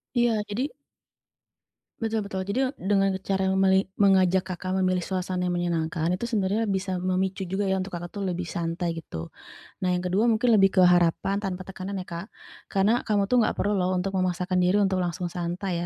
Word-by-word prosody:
Iya, 240 -1 +3 0.2
jadi 250 +8 -2 1.3
Betul 220 -2 -1
betul, 190 -1 -4
jadi, 225 +6 0
eee, 190 - -11
dengan 195 -1 +3
cara 190 0 0
meli 190 0 +3 0.2
mengajak 190 -2 +4
Kakak 185 +1 -5
memilih 185 -1 +1
suasana 185 -1 -2
yang 175 - 0
menyenangkan 165 -2 -1
itu 235 - -5
sebenarnya 215 -1 0
bisa 190 -2 -1
memicu 185 +1 -1
juga 190 +2 -2
ya 190 - +2
untuk 190 +1 -4
Kakak 175 0 -5
tuh 200 - -3
lebih 180 -2 -3
santai 170 +1 -2
gitu. 80 - -7 0.5
Nah 185 - +1
yang 180 - -2
kedua 190 +6 +2
mungkin 235 +2 +3
lebih 195 -3 +6
ke 185 - +6
harapan 180 +2 +3
tanpa 190 -2 -4
tekanan 190 +1 -6
ya 180 - -9
Kak, 170 +2 -6 0.4
karena 210 +5 +2
kamu 205 -2 +2
tuh 250 - +4
gak - - -2
perlu 205 - 0
loh 185 +1 +1
untuk 185 +2 -1
memaksakan 180 0 0
diri 180 +3 +3
untuk 190 -1 +1
langsung 175 0 -3
santai 175 +1 -3
190 Hz, 190 wpm, -26 LUFS, 180-200 Hz, 1.3 s, lebih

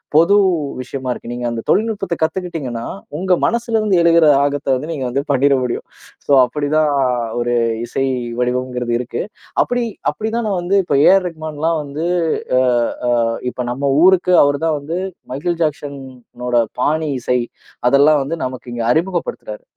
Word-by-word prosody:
பொது 170 +6 +5 0.5
விஷயமா 130 0 -5
இருக்கு. 120 - -6
நீங்க 120 0 -4
அந்த 115 -1 -4
தொழில்நுட்பத்தை 210 -5 0
கத்துக்கிட்டீங்கன்னா 160 -8 -3 0.3
உங்க 185 +3 -2
மனசிலருந்து 225 -3 +1
எழுகிற 170 -1 +5 0.2
ஆகத்தை 145 -1 -1
வந்து 145 +5 -5
நீங்க 140 -5 -3
வந்து 130 +3 -1
பண்ணிற 140 +1 +3
முடியும். 125 - -3 0.4
சோ - - -3
அப்படி 145 +4 -2
தான் 155 -1 +3 0.5
ஒரு 120 0 0 0.3
இசை 135 +3 -2 0.3
வடிவம்ங்கிறது 125 -1 -1
இருக்கு. 125 - -4 0.4
அப்படி 245 0 -1 0.3
அப்படி 220 - -4
தான் 235 -2 -1
நான் 190 -3 0
வந்து, 185 +3 +1
இப்போ 155 -6 0
ஏஆர் 190 0 +5
ரஹ்மான்லாம் 160 0 -2
வந்து 145 +3 -5 0.5
அ - - +4 0.5
அ - - +2 0.4
இப்ப - - -18
நம்ம 140 +3 -1 0.2
ஊருக்கு 185 -1 +4
அவரு 145 0 +1
தான் 160 -2 +1
வந்து 155 +5 -4 0.4
மைக்கேல் 165 +5 -2
ஜாக்சன் 145 -2 -3 0.5
ஓட 125 - 0 0.3
பாணி 155 +3 +1
இசை 125 +1 0 0.5
அதெல்லாம் 145 +2 +5
வந்து 160 +5 -4
நமக்கு 130 -1 -7
இங்க 120 -1 -3
அறிமுகப்படுத்துறாரு. - - -3
150 Hz, 150 wpm, -18 LUFS, 130-175 Hz, 0.5 s, பொது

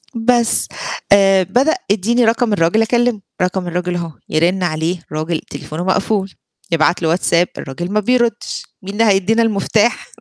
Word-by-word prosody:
بس، 235 0 +2 0.4
آآ 195 -1 +5
بدأ 255 - +2 0.2
"إديني 230 +4 +2
رقم 230 0 +2
الراجل 195 +3 +2
أكلمه." 235 -1 +1 0.2
"رقم 180 0 -1
الراجل 180 +1 -2
أهو،" 170 -2 -4 0.2
يرن 175 +4 +1
عليه 165 +1 -1
الراجل 155 +1 -2
تليفونه 155 +3 -7
مقفول، 195 +1 0 0.4
يبعت 165 +2 +2
له 165 - +1
واتساب 175 +1 +2
الراجل 175 +7 -6
ما 215 - +2
بيردش، 240 0 0 0.2
مين 195 0 -7
اللي 220 +2 +2
هيدّينا 215 +5 +2
المفتاح؟ 220 +1 +1
195 Hz, 145 wpm, -17 LUFS, 175-225 Hz, 0.4 s, آآ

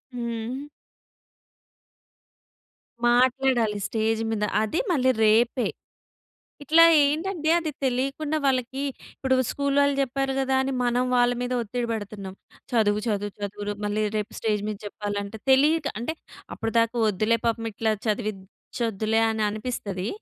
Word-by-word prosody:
హ్మ్. 235 +3 -4 2.4
మాట్లాడాలి 245 -3 +3
స్టేజ్ 225 0 0
మీద 210 -1 -1 0.2
అది 220 +10 -1
మళ్ళి 260 -5 +3
రేపే. 235 +4 +3 1.0
ఇట్లా 320 +4 +6 0.2
ఏంటంటే 315 +2 0
అది 325 -3 -2
తెలియకుండా 275 +4 -1
వాళ్ళకి 260 0 0 0.4
ఇప్పుడు 265 -1 +1
స్కూలోల్లు 280 0 +2
చెప్పారు 270 0 -1
కదా! 265 0 +1
అని 270 +1 -1
మనం 245 +1 +2
వాళ్ళ 245 0 +4
మీద 245 0 -3
ఒత్తిడి 235 +2 -3
పెడుతున్నాం. 205 -3 -6 0.4
చదువు, 210 -3 +2
చదువు, 205 -2 -1
చదువు 205 0 -5
రు 205 - -1
మళ్ళీ 205 +1 -1 0.2
రేపు 210 - -4
స్టేజ్ 210 -2 0
మీద 210 - -4
చెప్పాలంటే 205 +1 -4
తెలియక 295 +3 +4
అంటే 320 +7 -3 0.4
అప్పటిదాకా 230 +1 0
వద్దులే 215 +3 +2
పాపం 230 0 0
ఇట్లా 220 +1 0
చదివిచొద్దులే 215 +1 -2
అని 220 -1 -1
అనిపిస్తది. 210 -4 -4
235 Hz, 120 wpm, -25 LUFS, 215-265 Hz, 2.4 s, ఇట్లా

